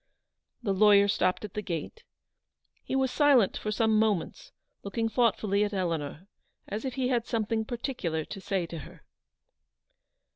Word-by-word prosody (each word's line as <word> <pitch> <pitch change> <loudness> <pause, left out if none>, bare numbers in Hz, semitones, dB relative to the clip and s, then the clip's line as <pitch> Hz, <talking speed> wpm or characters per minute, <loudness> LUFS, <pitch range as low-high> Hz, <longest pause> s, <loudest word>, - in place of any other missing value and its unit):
The 200 -4 +1
lawyer 200 0 +6
stopped 185 0 +1
at 205 - -10
the 210 - -3
gate. 175 - -5 0.8
He - - -3
was 265 -1 +1
silent 275 -9 +4
for 215 - -3
some 220 0 +2
moments, 220 - -1 0.3
looking 225 +3 -2
thoughtfully 210 -3 +2
at 205 0 -2
Eleanor, 165 -3 -3 0.4
as 210 +6 -4
if 260 - -3
he 255 -2 0
had 240 -3 0
something 225 -1 -1
particular 215 - -3
to 195 - -8
say 195 -3 -1
to 165 -1 -7
her. 140 - -12
210 Hz, 150 wpm, -28 LUFS, 190-235 Hz, 0.8 s, lawyer